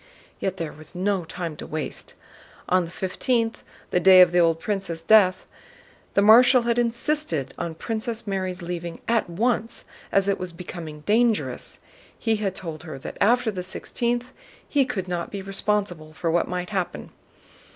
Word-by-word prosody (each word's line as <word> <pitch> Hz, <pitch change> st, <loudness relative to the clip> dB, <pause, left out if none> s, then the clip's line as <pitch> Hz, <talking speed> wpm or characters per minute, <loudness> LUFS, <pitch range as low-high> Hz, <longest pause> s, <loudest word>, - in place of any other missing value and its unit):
Yet 190 Hz, -1 st, -2 dB
there 165 Hz, -3 st, -4 dB
was 155 Hz, +4 st, -14 dB
no 190 Hz, -1 st, 0 dB
time 170 Hz, -1 st, -5 dB
to -, -, -8 dB
waste. 155 Hz, 0 st, -5 dB, 0.5 s
On 185 Hz, -1 st, +3 dB
the -, -, -9 dB
fifteenth, 225 Hz, +6 st, -1 dB, 0.3 s
the 180 Hz, -, +3 dB
day 185 Hz, +1 st, +8 dB
of 180 Hz, -1 st, +7 dB
the 175 Hz, -, +3 dB
old 165 Hz, -1 st, +3 dB
prince's 190 Hz, -4 st, -3 dB
death, 185 Hz, -1 st, +5 dB, 0.7 s
the 200 Hz, -, +5 dB
Marshal 245 Hz, +4 st, +7 dB
had 235 Hz, 0 st, +1 dB
insisted 235 Hz, -, -1 dB
on 165 Hz, -1 st, -4 dB
Princess 225 Hz, +4 st, -4 dB
Mary's 185 Hz, -3 st, -3 dB
leaving 170 Hz, -1 st, -5 dB
at 230 Hz, -5 st, +1 dB
once, 225 Hz, +5 st, -1 dB, 0.3 s
as 195 Hz, 0 st, +3 dB
it 200 Hz, -, +1 dB
was 180 Hz, -2 st, -4 dB
becoming 165 Hz, -3 st, -8 dB
dangerous. 225 Hz, +5 st, +1 dB, 0.4 s
He 225 Hz, -2 st, +1 dB
had 195 Hz, -3 st, -2 dB
told 165 Hz, -5 st, -6 dB
her 155 Hz, -5 st, -8 dB
that 135 Hz, -, -8 dB
after 235 Hz, +2 st, +3 dB
the 185 Hz, -3 st, -4 dB
sixteenth 240 Hz, +6 st, -2 dB, 0.4 s
he 280 Hz, -2 st, +2 dB
could 190 Hz, -6 st, -3 dB
not 175 Hz, -1 st, -3 dB
be 200 Hz, -1 st, -6 dB
responsible 195 Hz, -5 st, -1 dB
for 165 Hz, +1 st, -1 dB
what 170 Hz, +1 st, +2 dB
might 180 Hz, +1 st, -4 dB
happen. 190 Hz, -3 st, -3 dB
190 Hz, 165 wpm, -24 LUFS, 170-225 Hz, 0.7 s, day